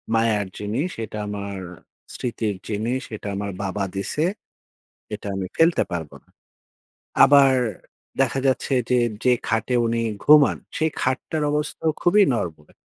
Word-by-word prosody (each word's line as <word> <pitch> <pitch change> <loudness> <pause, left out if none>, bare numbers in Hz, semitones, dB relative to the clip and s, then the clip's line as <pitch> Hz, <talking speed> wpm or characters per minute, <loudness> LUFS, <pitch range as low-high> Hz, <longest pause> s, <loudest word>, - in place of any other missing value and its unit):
মায়ার 110 -2 +2
জিনিস, 115 - -2 0.2
এটা 105 - -8
আমার 100 -1 -5 0.5
স্মৃতির 115 -4 -2
জিনিস, 115 +5 -1
এটা 105 - -8
আমার 100 0 -3
বাবা 100 +1 -2
দিছে। 100 +10 -1 0.9
এটা 105 - -8
আমি 95 -1 -3
ফেলতে 165 +1 +4
পারব 80 -4 -4
না।" - - -38 1.0
আবার 135 -1 +7 0.7
দেখা 135 0 +1
যাচ্ছে 130 +1 0 0.2
যে, 125 - +3 0.3
যে 125 - +4 0.2
খাটে 115 +3 0
উনি 115 0 0 0.2
ঘুমান 150 -1 +6 0.2
সেই 160 0 +1
খাটটার 140 +4 -1
অবস্থাও 150 +2 -1
খুবই 200 +4 +5
নরবরে। 80 -9 -4
115 Hz, 130 wpm, -23 LUFS, 100-140 Hz, 1.0 s, আবার